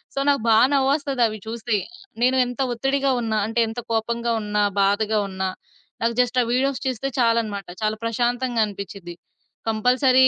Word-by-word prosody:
So, - - 0
నాకు 280 -4 +2
బా 220 - +6 0.2
నవ్వొస్తదవి 270 -5 +1
చూస్తే. 225 -1 -1 0.5
నేను 260 +1 +3
ఎంత 245 0 -7
ఒత్తిడిగా 270 +2 +1
ఉన్న, 225 -1 -2
అంటే 225 +1 -1
ఎంత 225 +2 -5
కోపంగా 235 +1 0
ఉన్న, 210 0 -3 0.2
బాధగా 210 +2 +2
ఉన్నా, 190 0 -2 0.5
నాకు 230 0 +1
జస్ట్ 250 +1 -1
ఆ - - -3
వీడియోస్ 270 +1 +1
చూస్తే 255 +1 -2
చాలన్నమాట. 230 -4 +1 0.2
చాలా 215 0 +1
ప్రశాంతంగా 240 +1 0
అనిపిచ్చిద్ది. 195 -3 -8 0.5
కంపల్సరీ 255 +4 +4
235 Hz, 145 wpm, -23 LUFS, 215-255 Hz, 0.5 s, బా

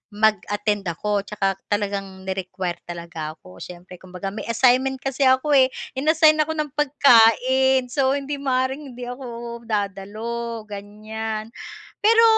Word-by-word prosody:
mag-attend 205 -1 +1
ako 200 +4 -2
tsaka 195 -2 -1
talagang 195 -2 -3
ni-require 185 -1 -4
talaga 170 -2 -6
ako 90 -10 -16
siyempre 180 - -10
kumbaga 185 +1 -6
may 215 - -7
assignment 255 +3 +3
kasi 270 0 +1
ako 260 +3 +3
eh 265 -2 +6 0.2
in-assign 310 +3 +4
ako 315 +1 +1
ng 300 -2 -2
pagkain. 260 -2 +4
So, 270 0 +2
hindi 280 0 -4
maaring 265 0 -1
hindi 250 - -8
ako 235 -2 -7
dadalo, 215 +3 -3
ganiyan. 215 +2 -6 0.5
Pero 455 +2 +5
225 Hz, 125 wpm, -23 LUFS, 195-265 Hz, 0.5 s, eh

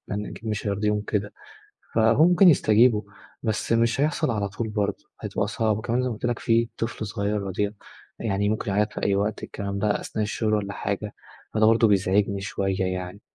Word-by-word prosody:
لأن 105 +1 -3
أكيد 115 - -8
مش 105 0 -3
هيرضيهم 105 +1 0
كده. 105 0 -2 0.6
فهو 115 +7 +5
ممكن 180 +1 +6
يستجيبوا، 110 -5 +4 0.4
بس 110 0 -2
مش 115 +3 +2
هيحصل 145 -4 +1
على 100 -2 -1
طول 110 +3 -4
برضه، 105 -2 -2 0.2
هتبقى - - -2
صعب. 110 -2 0
وكمان 115 +3 -1
زي 125 - 0
ما - - -3
قُلت 110 - -5
لك، 120 -1 -1
في 115 0 +2
طفل 115 -1 -3
صغير 105 0 -2
رضيع، 100 +1 -2 0.5
يعني 100 -2 0
ممكن 110 -2 -1
يعيط 105 +2 +1
في - - -6
أي 100 - +2
وقت، 105 +2 -1
الكلام 100 -1 -4
ده 105 0 +1
أثناء 110 - -3
الشغل 110 +1 -1
والّا 100 -1 -1
حاجة، 100 +1 -3 0.4
فده 110 0 +3
برضه 115 +1 +5
بيزعجني 100 0 +2
شوية 95 -1 -2
يعني، 95 +2 -3
105 Hz, 190 wpm, -25 LUFS, 100-115 Hz, 0.6 s, ممكن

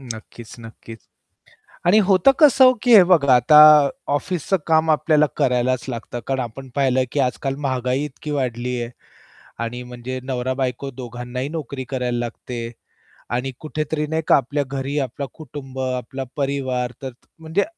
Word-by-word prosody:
नक्कीच, 115 -2 -10
नक्कीच 115 0 -11 0.9
आणि 190 +5 +6
होतं 190 +5 +5
कसं, 270 -4 +7
की 245 -2 +5
हे 205 - +10
बघा 155 -8 +4
आता 125 +5 +6 0.6
ऑफिसचं 175 +5 -1
काम 160 0 +3
आपल्याला 150 0 +3
करायलाच 125 -2 +1
लागतं. 120 0 -5
कारण 135 -1 -1
आपण 130 +2 -7
पाहिलं, 130 -2 +2
की 145 - 0
आजकाल 135 +1 -1
महागाई 130 -1 -1
इतकी 150 +1 -8
वाढली 125 -3 -2
आहे 120 0 -5 0.7
आणि 120 +2 -5
म्हणजे 125 +1 -7
नवरा-बायको 130 0 -3
दोघांनाही 125 +1 -6
नोकरी 140 -4 -5
करायला 125 -2 -2
लागते. 120 0 -6 0.6
आणि 125 +3 -2
कुठेतरी 155 0 -3
नाही 160 +1 -1
का - - +6
आपल्या 140 +2 -1
घरी 135 +1 -4
आपला 140 +1 -4
कुटुंब, 140 -4 -9
आपला 130 +1 -3
परिवार 130 -3 -1
तर 135 - -4
त 120 - -30
म्हणजे 160 +5 0
130 Hz, 145 wpm, -21 LUFS, 125-150 Hz, 0.9 s, हे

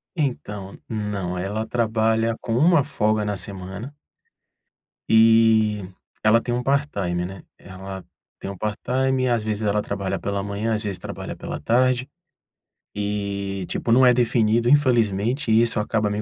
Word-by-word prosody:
Então, 105 - -3
não, 105 -5 -3
ela 100 +5 -3
trabalha 115 -1 +1
com 115 - -3
1 160 +1 +5
folga 110 -6 0
na 105 -1 -2
semana 100 +8 -6 1.2
e, 110 -1 +5 0.4
ela 110 +2 +5
tem 120 - -3
um 120 - 0
part-time, 105 -11 0
né. 95 +1 -8 0.2
Ela 95 0 -9 0.3
tem - - -7
um 100 - -9
part-time, 130 +6 -1
e - - +2
às 120 -3 +1
vezes 110 0 -2
ela 105 0 +1
trabalha 100 -2 -3
pela 100 0 -2
manhã, 100 +3 -2
às 110 - -4
vezes 100 -4 -3
trabalha - - -7
pela - - -6
tarde. 125 +2 +2 0.9
E, 100 -2 -3
tipo, 115 - -2
não 130 +3 +6
é 125 - +7
definido, 120 -1 +2
infelizmente, 120 -3 +2
e 110 +1 +5
isso 115 -1 -1
acaba 105 0 0
me 105 +1 -2
110 Hz, 150 wpm, -23 LUFS, 100-120 Hz, 1.2 s, é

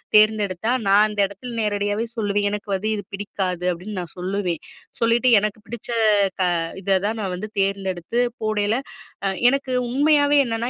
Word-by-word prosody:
தேர்ந்தெடுத்தா 215 -1 +3 0.2
நான் 205 +2 +6
அந்த 210 -1 -6
இடத்தில 200 +6 -8
நேரடியாகவே 205 +1 0
சொல்லுவேன் 205 -1 +1
"எனக்கு 205 0 -5
வந்து 200 +3 -1
இது 205 - -5
பிடிக்காது." 190 -3 -3
அப்பிடின்னு 185 +4 -6
நான் 175 -3 -7
சொல்லுவேன். 180 -2 -2 0.4
சொல்லிட்டு 235 +2 +3
எனக்கு 215 +1 -3
பிடிச்ச 235 +1 -8 0.9
இத 195 0 +2
தான் 220 +2 -1
நான் 190 -2 -2
வந்து 210 +4 -5
தேர்ந்தெடுத்து 195 +2 -1 0.2
போடையில, 215 0 +1 0.7
எனக்கு 275 -1 -1
உண்மையாவே 290 +2 +3
என்னன்னா, 230 +1 -2
205 Hz, 140 wpm, -22 LUFS, 195-225 Hz, 0.9 s, நான்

